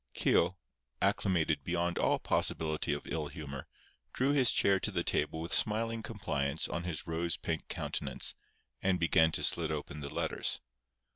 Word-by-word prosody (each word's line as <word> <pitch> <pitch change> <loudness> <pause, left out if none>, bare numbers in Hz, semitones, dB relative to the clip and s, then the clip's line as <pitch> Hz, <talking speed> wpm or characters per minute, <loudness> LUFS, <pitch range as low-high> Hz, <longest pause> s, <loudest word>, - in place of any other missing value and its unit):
Keogh, 90 +2 +3 0.4
acclimated 80 -6 +1
beyond 85 +1 0
all - - +3
possibility 80 -2 0
of 75 - -3
ill 75 -1 -2
humour, 70 -3 -7 0.5
drew 135 +2 +2
his 135 -4 +4
chair 100 -1 +3
to - - 0
the - - -1
table 80 - 0
with 85 +1 -3
smiling 115 +1 +2
compliance 80 -10 -2
on 85 0 -3
his 85 -4 -4
rose 85 +1 0
pink 80 -1 -3
countenance, - - -1 0.5
and 95 -1 +2
began 80 -1 +4
to - - -1
slit - - +2
open 75 - -4
the 70 -1 -5
letters. - - +1
85 Hz, 155 wpm, -32 LUFS, 75-95 Hz, 0.5 s, his